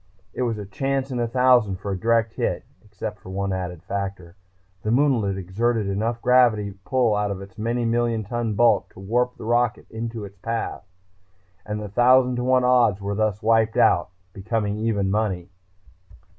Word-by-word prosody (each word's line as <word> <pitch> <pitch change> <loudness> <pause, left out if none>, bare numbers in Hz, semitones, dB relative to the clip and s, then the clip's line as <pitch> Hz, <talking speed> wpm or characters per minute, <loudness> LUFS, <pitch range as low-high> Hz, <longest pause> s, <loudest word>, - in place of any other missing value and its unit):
It - - -4
was 115 -3 0
a 105 - -6
chance 135 +7 -2
in 125 - -2
a 120 - 0
thousand 125 -4 +3
for 100 +2 -5
a - - -1
direct 115 +2 +1
hit, - - -2 0.2
except 105 0 -7
for - - -12
one 100 0 -2
added 90 -2 -5
factor 95 -3 -5 0.5
the 105 - -3
moonlet 120 -6 +2
exerted 105 +4 -1
enough 110 +4 -2
gravity 115 -5 +3
pull 125 -4 +2
out 105 0 0
of 100 -1 -4
its 95 -1 -11
many 120 +2 -1
million 115 -1 0
ton 115 0 -2
bulk 120 +3 +3
to - - -13
warp 120 +5 -1
the - - -9
rocket 120 0 +1
into 115 -1 -5
its 100 -1 -14
path. 115 +3 -3 0.8
And 105 0 -3
the 105 - -5
thousand 125 +4 +4
to 125 - -1
one 130 0 +3
odds 125 -5 +4
were 100 0 -3
thus 105 0 -1
wiped 110 0 +3
out, - - +4 0.2
becoming 105 +1 -2
even 105 -4 0
money. 95 -4 -1
110 Hz, 180 wpm, -23 LUFS, 100-120 Hz, 0.8 s, thousand